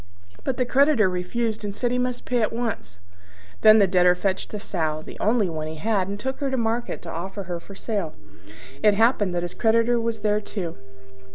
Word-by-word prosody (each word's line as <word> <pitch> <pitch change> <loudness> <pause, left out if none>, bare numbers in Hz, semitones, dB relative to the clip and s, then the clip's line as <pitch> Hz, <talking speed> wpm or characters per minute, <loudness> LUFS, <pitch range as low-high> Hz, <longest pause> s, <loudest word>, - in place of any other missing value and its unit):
But 260 - -2
the 250 - +1
creditor 270 -4 +4
refused 210 +5 -2
and 200 -1 -4
said 245 +1 -1
he 250 - 0
must 250 0 -2
pay 245 -2 +1
at 215 - +1
once. 225 - -4 0.6
Then 215 0 +8
the 205 - +6
Debtor 180 -1 +4
fetched 190 +1 -2
a 210 - -4
Sow 155 -6 -2
the - - -10
only 215 -2 +2
one 155 -2 -4
he 155 - -6
had 195 +2 0
and 200 +1 -5
took 265 +3 -3
her 280 - -1
to 265 - -1
market 230 0 -1
to 165 - -6
offer 190 +4 -5
her 175 -1 -4
for 195 +3 -12
sale. 200 -7 -3 0.7
It 210 -1 +5
happened 210 -4 +2
that 175 - 0
his 175 - -4
creditor 230 +1 +2
was 230 0 -2
there 210 0 +1
too. 180 -6 -5
210 Hz, 210 wpm, -24 LUFS, 180-235 Hz, 0.7 s, Then